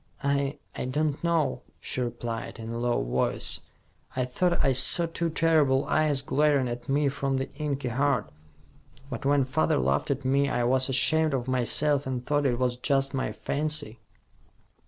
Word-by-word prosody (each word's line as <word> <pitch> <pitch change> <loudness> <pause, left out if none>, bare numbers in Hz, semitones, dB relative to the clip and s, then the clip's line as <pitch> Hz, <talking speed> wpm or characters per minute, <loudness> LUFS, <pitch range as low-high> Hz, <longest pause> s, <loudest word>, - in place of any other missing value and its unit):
"I 140 +1 0 0.2
I - - -3
don't 145 +3 -1
know," 170 -3 +1 0.2
she 130 - -4
replied, 120 -1 -4
in 115 0 -6
a 115 - -3
low 120 0 0
voice. - - -1 0.6
"I 130 -1 0
thought 175 +8 0
I 135 - +4
saw 135 +6 +4
two 165 0 -2
terrible 155 -5 +3
eyes 150 -3 +1
glaring 145 -2 +2
at 120 +3 -6
me 145 +1 +2
from 135 0 -1
the 135 - -4
inky 140 -3 -3
heart. 125 - 0 0.8
But 120 +1 -5
when 140 -1 +3
father 140 +5 +1
laughed 70 +2 0
at 140 -1 -2
me, 140 +2 +2
I 120 - 0
was 130 +2 +2
ashamed 155 +3 +3
of 125 -1 -3
myself 135 +3 +1
and 125 -2 -3
thought 145 -1 +1
it 120 -2 0
was 125 -1 0
just 135 +1 0
my 130 - -1
fancy." 150 -7 -3
135 Hz, 170 wpm, -27 LUFS, 125-145 Hz, 0.8 s, I